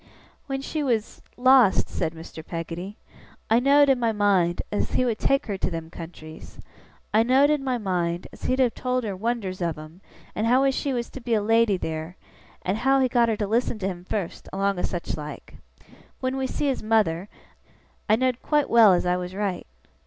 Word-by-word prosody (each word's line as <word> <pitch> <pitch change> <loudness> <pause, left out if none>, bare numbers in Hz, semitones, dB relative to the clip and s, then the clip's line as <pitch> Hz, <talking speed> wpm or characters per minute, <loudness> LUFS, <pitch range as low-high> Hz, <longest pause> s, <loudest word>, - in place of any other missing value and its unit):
'When 270 -1 -3
she 310 +2 -3
was 235 -6 -1 0.2
lost,' 255 -5 +5
said 160 - -3
Mr. 160 0 -10
Peggotty, 170 +4 -6 0.5
'I 225 - +6
know'd 280 +3 +5
in 270 -2 +3
my 230 -2 +1
mind, 195 -5 +2
as 205 - -2
he 255 - +2
would 230 -3 -1
take 275 +1 +1
her 200 -4 -4
to - - 0
them 165 -2 -6
countries. 160 -2 -10 0.6
I 215 - +5
know'd 265 +5 +4
in 295 -2 0
my 260 -2 0
mind, 180 -4 -2
as - - -10
he'd 255 - +1
have 255 -3 +2
told 255 0 -1
her 205 -3 -3
wonders 200 -3 -3
of 170 -3 -1
'em, 155 +4 -12 0.3
and 215 - -1
how 260 +3 +4
she 275 +1 -2
was 240 -2 -3
to 265 - -9
be 235 -1 0
a 215 - +1
lady 225 -2 +3
theer, 160 +1 -5 0.5
and 195 +4 -1
how 270 +2 +3
he 260 - +3
got 240 -2 +2
her 220 - 0
to 210 - -1
listen 230 +2 0
to 190 -2 -3
him 180 -2 -5
fust, 185 -1 -5
along 195 -1 0
o' - - -1
sech 175 -1 -3
like. 150 -2 -9 0.6
When 255 0 -2
we 265 -1 -1
see 295 - -3
his 270 -2 0
mother, 210 -4 +1 0.8
I 215 - +6
know'd 255 +1 0
quite 295 -2 +1
well 225 -4 +7
as 175 - +1
I 180 0 +1
was 180 +1 -6
right. 200 -3 -3
215 Hz, 205 wpm, -25 LUFS, 180-255 Hz, 0.8 s, well